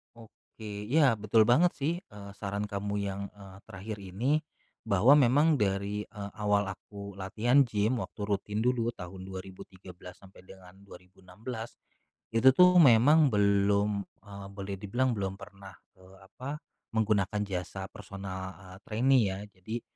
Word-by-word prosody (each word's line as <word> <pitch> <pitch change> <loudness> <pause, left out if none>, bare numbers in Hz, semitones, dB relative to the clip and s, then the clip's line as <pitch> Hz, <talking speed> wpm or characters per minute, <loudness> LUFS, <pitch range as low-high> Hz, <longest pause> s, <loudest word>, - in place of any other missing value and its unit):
Oke, 110 -2 -10
ya 140 -6 +5
betul 110 +1 +3
banget 170 +9 +5
sih, 150 +4 -2
eee, 105 - -11
saran 100 +1 -4
kamu 100 0 -3
yang, 100 -1 -3
eee, 100 -2 -14
terakhir 105 +1 -8
ini, 125 - 0 0.4
bahwa 110 +6 +5
memang 145 +4 +4
dari, 100 -2 -1
eee, 100 -2 -9
awal 105 -1 +1
aku 100 +1 -9
latihan 110 +8 +2
gym, 115 0 0
waktu 105 -2 -7
rutin 105 +1 -2
dulu 120 -1 +1
tahun 95 -3 -9
2013 95 -1 -11
sampai 95 -1 -17
dengan 95 -1 -15
2016, 95 +5 -10 0.5
itu 125 +4 +5
tuh 180 +2 +6
memang 145 +2 +6
belum, 100 0 +2 0.2
eee, 100 -1 -10
boleh 100 0 -5
dibilang 120 +7 0
belum 95 -1 -2
pernah, 95 -1 -12 0.2
eee, 95 +1 -17
apa, 140 - -8 0.3
menggunakan 105 -2 +1
jasa, 95 0 -5
personal, 95 -1 -7
eee, 95 0 -12
trainee 125 +3 +3
ya. 95 0 -3
Jadi 110 +5 -7
100 Hz, 140 wpm, -29 LUFS, 95-115 Hz, 0.5 s, tuh